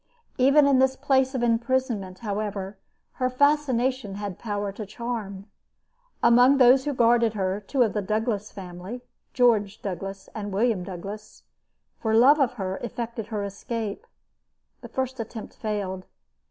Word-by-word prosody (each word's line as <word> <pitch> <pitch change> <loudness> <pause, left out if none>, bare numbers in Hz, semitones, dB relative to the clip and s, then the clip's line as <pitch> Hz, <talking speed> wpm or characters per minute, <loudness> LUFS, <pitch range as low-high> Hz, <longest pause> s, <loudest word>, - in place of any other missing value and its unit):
Even 280 +3 +6
in 275 -2 +4
this 265 0 +3
place 265 -1 +1
of 245 - -1
imprisonment, 235 -5 0
however, 205 -1 -3 0.5
her 255 - +3
fascination 260 -5 +1
had 200 -3 -5
power 205 -2 -3
to 210 +2 -7
charm. 210 -2 -5 0.8
Among 245 +4 +6
those 260 +1 +6
who 290 - -1
guarded 235 -2 +3
her, 190 0 -1
two 250 +6 +1
of 220 - 0
the 210 - -1
Douglas 215 +1 -2
family 190 +6 -8 0.3
George 220 -5 +3
Douglas 195 0 -5
and 205 -2 -5
William 210 -1 +1
Douglas 200 +4 -8 0.6
for 220 -1 0
love 270 +7 +6
of 265 -4 +2
her, 190 -5 -4
effected 235 -2 -5
her 215 -3 -3
escape. 205 +1 -5 0.7
The - - -10
first 260 0 -3
attempt 225 -1 -7
failed. 195 -3 -4
225 Hz, 140 wpm, -25 LUFS, 200-250 Hz, 0.8 s, Even